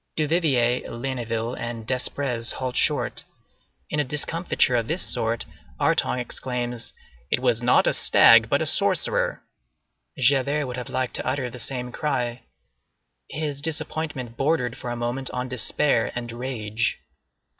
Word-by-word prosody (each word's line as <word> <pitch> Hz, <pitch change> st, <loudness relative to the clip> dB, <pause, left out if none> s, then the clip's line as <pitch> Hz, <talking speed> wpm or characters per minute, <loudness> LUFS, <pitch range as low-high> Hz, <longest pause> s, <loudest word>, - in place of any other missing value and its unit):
Duvivier, 145 Hz, -6 st, +2 dB
Ligniville, 120 Hz, -2 st, -3 dB
and 115 Hz, -2 st, -5 dB
Desprez 125 Hz, -2 st, -1 dB
halt 130 Hz, -1 st, -4 dB
short. -, -, +2 dB, 0.7 s
In -, -, 0 dB
a -, -, +3 dB
discomfiture 150 Hz, -1 st, +1 dB
of 115 Hz, -2 st, 0 dB
this 170 Hz, +4 st, 0 dB
sort, 115 Hz, 0 st, -1 dB, 0.3 s
Artonge 125 Hz, -, +2 dB
exclaims, 120 Hz, -1 st, -4 dB, 0.4 s
"It -, -, +1 dB
was 125 Hz, -2 st, +1 dB
not 120 Hz, +1 st, +4 dB
a -, -, +3 dB
stag, -, -, +6 dB
but -, -, +2 dB
a -, -, -2 dB
sorcerer." -, -, +2 dB, 0.7 s
Javert 140 Hz, +3 st, +2 dB
would 125 Hz, -1 st, -5 dB
have 125 Hz, -, -5 dB
liked 130 Hz, -1 st, -2 dB
to -, -, -4 dB
utter 130 Hz, -2 st, -1 dB
the 125 Hz, -, -9 dB
same 125 Hz, +1 st, -3 dB
cry. 125 Hz, -4 st, -2 dB, 0.9 s
His 145 Hz, -2 st, -4 dB
disappointment 150 Hz, -5 st, -2 dB
bordered 135 Hz, -5 st, +1 dB
for 120 Hz, -, -6 dB
a 120 Hz, -, -2 dB
moment 120 Hz, +2 st, -2 dB
on 125 Hz, 0 st, -3 dB
despair 125 Hz, +1 st, +1 dB
and 120 Hz, -1 st, -4 dB
rage. 115 Hz, -3 st, -2 dB
125 Hz, 140 wpm, -24 LUFS, 120-140 Hz, 0.9 s, stag